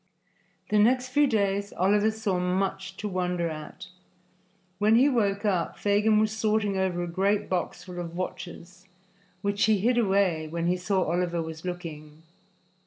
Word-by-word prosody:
The 210 Hz, -, +3 dB
next 250 Hz, +4 st, +3 dB
few 290 Hz, +3 st, +3 dB
days 200 Hz, -3 st, 0 dB
Oliver 205 Hz, +4 st, +3 dB
saw 215 Hz, -4 st, -1 dB
much 190 Hz, +1 st, -2 dB
to 210 Hz, -, -4 dB
wonder 180 Hz, -3 st, -1 dB
at. 155 Hz, +4 st, -8 dB, 0.9 s
When 215 Hz, +2 st, +4 dB
he 255 Hz, +4 st, +6 dB
woke 205 Hz, -6 st, +1 dB
up, 185 Hz, -5 st, 0 dB
Fagin 210 Hz, +1 st, +2 dB
was 215 Hz, 0 st, +2 dB
sorting 215 Hz, -2 st, +1 dB
over 185 Hz, -2 st, 0 dB
a -, -, -3 dB
great 195 Hz, +4 st, 0 dB
box 180 Hz, -1 st, -3 dB
full 180 Hz, -1 st, -8 dB
of 170 Hz, -1 st, -6 dB
watches, 180 Hz, 0 st, -7 dB, 0.6 s
which 200 Hz, +1 st, +1 dB
he 215 Hz, -1 st, +3 dB
hid 240 Hz, +5 st, +2 dB
away 190 Hz, -7 st, +1 dB
when 165 Hz, +2 st, -3 dB
he 175 Hz, +1 st, +2 dB
saw 185 Hz, +1 st, 0 dB
Oliver 175 Hz, 0 st, -1 dB
was 160 Hz, 0 st, -8 dB
looking. 160 Hz, -4 st, -7 dB
190 Hz, 160 wpm, -27 LUFS, 175-210 Hz, 0.9 s, he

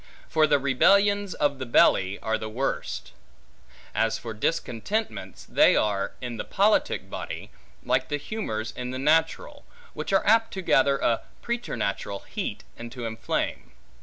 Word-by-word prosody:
For 155 Hz, -1 st, +3 dB
the 145 Hz, -, +4 dB
rebellions 200 Hz, +8 st, +3 dB
of 145 Hz, -2 st, 0 dB
the 130 Hz, -, -3 dB
belly 95 Hz, -4 st, +4 dB
are 110 Hz, 0 st, 0 dB
the 110 Hz, -, -5 dB
worst. 130 Hz, +5 st, -3 dB, 0.8 s
As 115 Hz, 0 st, +1 dB
for 115 Hz, -1 st, -6 dB
discontentments, 165 Hz, -, -2 dB
they -, -, +5 dB
are, 100 Hz, -2 st, 0 dB
in 120 Hz, -2 st, -5 dB
the -, -, -3 dB
politic 205 Hz, +2 st, +1 dB
body, -, -, -6 dB, 0.3 s
like -, -, +1 dB
to 145 Hz, -, 0 dB
humors 125 Hz, -, -4 dB
in 125 Hz, 0 st, -5 dB
the 130 Hz, -, -4 dB
natural, 160 Hz, -, +1 dB, 0.3 s
which -, -, -4 dB
are 195 Hz, -, +3 dB
apt 225 Hz, +1 st, +4 dB
to 190 Hz, -, -4 dB
gather 140 Hz, -4 st, +4 dB
a 115 Hz, -4 st, +1 dB, 0.2 s
preternatural 100 Hz, -, -3 dB
heat, -, -, -5 dB
and 120 Hz, 0 st, -8 dB
to 125 Hz, -3 st, -6 dB
inflame. 110 Hz, 0 st, -3 dB
135 Hz, 150 wpm, -26 LUFS, -, 0.8 s, they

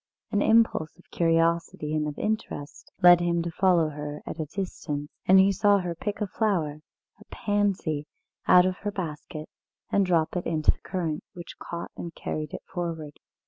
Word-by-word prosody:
An 205 Hz, -, +2 dB
impulse 220 Hz, -9 st, +3 dB
of 180 Hz, -, -23 dB
curiosity 165 Hz, -2 st, +1 dB
and 155 Hz, -1 st, 0 dB
of 150 Hz, -, -5 dB
interest 210 Hz, -9 st, -4 dB
led 175 Hz, -1 st, +9 dB
him 170 Hz, -1 st, +1 dB
to 170 Hz, -, -3 dB
follow 175 Hz, -2 st, +3 dB
her 150 Hz, 0 st, -6 dB
at 165 Hz, -, -6 dB
a 155 Hz, -, -2 dB
distance, 150 Hz, -4 st, -4 dB, 0.2 s
and 190 Hz, +1 st, +8 dB
he 195 Hz, +1 st, +6 dB
saw 205 Hz, +1 st, +4 dB
her 180 Hz, -3 st, -2 dB
pick 205 Hz, +5 st, -4 dB
a -, -, +2 dB
flower, 175 Hz, -8 st, -1 dB, 0.4 s
a -, -, -16 dB
pansy, 195 Hz, -8 st, -1 dB, 0.4 s
out 180 Hz, 0 st, +7 dB
of 185 Hz, -1 st, 0 dB
her 205 Hz, -, -3 dB
basket, 155 Hz, -4 st, -6 dB, 0.4 s
and 200 Hz, -, +4 dB
drop 170 Hz, -3 st, +1 dB
it 180 Hz, -, -2 dB
into 155 Hz, -2 st, +3 dB
the -, -, -11 dB
current, 165 Hz, -5 st, -3 dB
which 175 Hz, -2 st, -10 dB
caught 170 Hz, 0 st, -6 dB
and 170 Hz, -1 st, -7 dB
carried 155 Hz, 0 st, -4 dB
it -, -, -7 dB
forward. 165 Hz, -5 st, -5 dB
170 Hz, 180 wpm, -27 LUFS, 155-190 Hz, 0.4 s, led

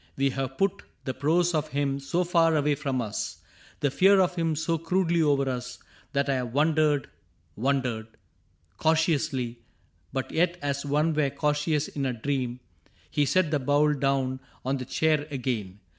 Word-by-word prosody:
We 135 Hz, 0 st, +2 dB
have 135 Hz, 0 st, -4 dB
put 195 Hz, -1 st, +1 dB, 0.2 s
The 130 Hz, -, -2 dB
prose 170 Hz, +6 st, +2 dB
of 155 Hz, -1 st, 0 dB
him 140 Hz, -2 st, -1 dB
so 170 Hz, +6 st, 0 dB
far 165 Hz, -2 st, +3 dB
away 150 Hz, 0 st, +2 dB
from 135 Hz, -4 st, -1 dB
us. 105 Hz, -1 st, -4 dB, 0.4 s
The 145 Hz, -, +2 dB
fear 195 Hz, +6 st, +5 dB
of 185 Hz, -1 st, +3 dB
him 165 Hz, -3 st, 0 dB
so 165 Hz, +1 st, -1 dB
crudely 170 Hz, 0 st, +1 dB
over 140 Hz, -3 st, +2 dB
us. 125 Hz, -1 st, -4 dB, 0.4 s
That 140 Hz, 0 st, +1 dB
I 135 Hz, -1 st, +1 dB
have 125 Hz, -2 st, -3 dB
wondered 150 Hz, -2 st, +2 dB, 0.3 s
— 85 Hz, -2 st, -40 dB
wondered." 125 Hz, -3 st, -1 dB, 0.4 s
— -, -, -40 dB
Cau 160 Hz, +1 st, +4 dB
tiously, 145 Hz, -7 st, 0 dB, 0.5 s
But 135 Hz, -1 st, -3 dB
yet 175 Hz, +1 st, +1 dB
as 140 Hz, -1 st, -2 dB
one 150 Hz, +3 st, +2 dB
were 150 Hz, -2 st, +2 dB
cautious 150 Hz, +1 st, 0 dB
in 140 Hz, -2 st, -3 dB
a 130 Hz, -, -1 dB
dream. 125 Hz, 0 st, -2 dB, 0.5 s
He 145 Hz, -, +2 dB
set 175 Hz, +1 st, +2 dB
the 150 Hz, -, +2 dB
bowl 145 Hz, +3 st, +3 dB
down 135 Hz, -2 st, 0 dB, 0.3 s
on 135 Hz, +1 st, 0 dB
the 130 Hz, -, -5 dB
chair 155 Hz, +2 st, +1 dB
again. 115 Hz, -8 st, -3 dB
145 Hz, 175 wpm, -27 LUFS, 130-160 Hz, 0.5 s, fear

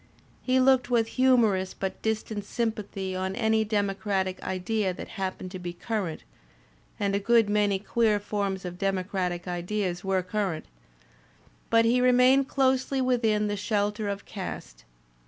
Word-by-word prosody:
He 255 Hz, 0 st, +2 dB
looked 255 Hz, -1 st, +4 dB
with 230 Hz, -2 st, +2 dB
humor 250 Hz, -5 st, +4 dB
ous 185 Hz, 0 st, -4 dB
but 190 Hz, -1 st, -4 dB
distant 220 Hz, -1 st, -2 dB
sympathy 205 Hz, -4 st, -3 dB
on 190 Hz, +1 st, -2 dB
any 220 Hz, -1 st, +2 dB
democratic 200 Hz, -2 st, -1 dB
idea 190 Hz, 0 st, -1 dB
that -, -, -8 dB
hap 190 Hz, -1 st, -3 dB
pened 185 Hz, -, -8 dB
to 185 Hz, -, -6 dB
be 175 Hz, -1 st, -5 dB
current 190 Hz, -3 st, -3 dB, 0.8 s
(and 200 Hz, -1 st, 0 dB
a 200 Hz, -, +2 dB
good 230 Hz, +1 st, +4 dB
many 205 Hz, -1 st, +2 dB
queer 215 Hz, +1 st, +1 dB
forms 200 Hz, -2 st, -3 dB
of 180 Hz, 0 st, -6 dB
demo 195 Hz, -2 st, 0 dB
cratic 180 Hz, -2 st, -3 dB
ideas 180 Hz, +1 st, -2 dB
were 190 Hz, -1 st, 0 dB
current), 185 Hz, -3 st, -2 dB, 1.0 s
but 230 Hz, 0 st, +4 dB
he 245 Hz, +2 st, +3 dB
remained 255 Hz, +2 st, +5 dB
closely 265 Hz, 0 st, +1 dB
within 230 Hz, -5 st, +2 dB
the 205 Hz, 0 st, -1 dB
shelter 205 Hz, 0 st, -1 dB
of 200 Hz, 0 st, -4 dB
caste. -, -, -7 dB
205 Hz, 155 wpm, -27 LUFS, 190-230 Hz, 1.0 s, remained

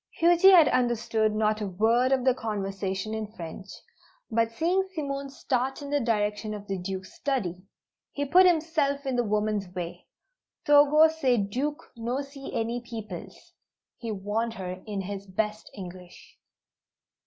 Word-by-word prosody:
Huji 345 Hz, +3 st, +6 dB
had 345 Hz, -6 st, +8 dB
understood 230 Hz, -3 st, +1 dB
not 215 Hz, 0 st, +1 dB
a 205 Hz, -, -1 dB
word 225 Hz, +7 st, +2 dB
of 260 Hz, -2 st, +2 dB
the 260 Hz, -, +5 dB
conversation 195 Hz, -3 st, -3 dB
in 220 Hz, -1 st, -3 dB
French, 190 Hz, -2 st, -9 dB, 0.6 s
but 230 Hz, 0 st, +2 dB
seeing 360 Hz, +10 st, 0 dB
Simone 280 Hz, -3 st, -3 dB
start 265 Hz, -1 st, -2 dB
in 285 Hz, -, -7 dB
the 290 Hz, -, +2 dB
direction 215 Hz, -2 st, -1 dB
of 205 Hz, -1 st, -8 dB
the 195 Hz, -2 st, -3 dB
Duke's 190 Hz, +1 st, -6 dB
"study," 195 Hz, -11 st, -2 dB, 0.5 s
he 285 Hz, -, -2 dB
put 365 Hz, +6 st, +6 dB
himself 310 Hz, -4 st, +1 dB
in 265 Hz, -2 st, -1 dB
the 245 Hz, -, +2 dB
woman's 210 Hz, -2 st, 0 dB
way. 175 Hz, -2 st, -6 dB, 0.6 s
"Togo 295 Hz, +2 st, +7 dB
say 280 Hz, -6 st, +1 dB
Duke 265 Hz, +10 st, -2 dB
no 240 Hz, +4 st, -2 dB
see 275 Hz, 0 st, -9 dB
any 230 Hz, +2 st, -2 dB
peoples," 220 Hz, -7 st, -9 dB, 0.5 s
he 230 Hz, -2 st, -4 dB
warned 215 Hz, +3 st, -2 dB
her 185 Hz, -2 st, -6 dB
in 205 Hz, -2 st, -3 dB
his 200 Hz, +1 st, -6 dB
best 210 Hz, +3 st, -3 dB
English. 180 Hz, -2 st, -11 dB
225 Hz, 150 wpm, -27 LUFS, 205-275 Hz, 0.6 s, had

